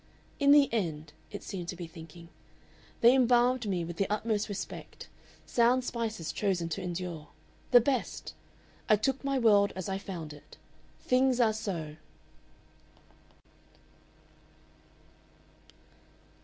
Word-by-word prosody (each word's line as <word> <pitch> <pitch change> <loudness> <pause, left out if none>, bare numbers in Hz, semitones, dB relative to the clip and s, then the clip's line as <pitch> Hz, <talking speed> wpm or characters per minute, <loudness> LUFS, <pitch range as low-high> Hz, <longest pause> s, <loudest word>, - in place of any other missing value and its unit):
"In 280 -1 +3
the 290 -1 +7
end," 160 -8 -2 0.2
it - - -8
seemed 180 -3 -6
to 180 - -4
be 175 -1 -6
thinking, 165 0 -12 0.7
"they 235 +2 +7
embalmed 250 -1 +3
me 175 -3 -1
with 170 0 -7
the 195 - 0
utmost 215 0 -1
respect 200 -1 -7 0.4
sound 245 +2 +3
spices 225 -9 -3
chosen 185 -5 -1
to 180 +4 -3
endure 175 -3 -5 0.4
the 245 -1 +7
best! 260 0 -2 0.6
I 215 - +7
took 265 +7 -1
my 275 0 0
world 205 -4 +4
as 185 -2 -5
I 195 0 -2
found 170 -6 -7
it. 145 - -16 0.4
THINGS 255 0 +2
ARE 225 -3 +4
SO!" 165 -8 -5
200 Hz, 120 wpm, -30 LUFS, 170-240 Hz, 0.7 s, the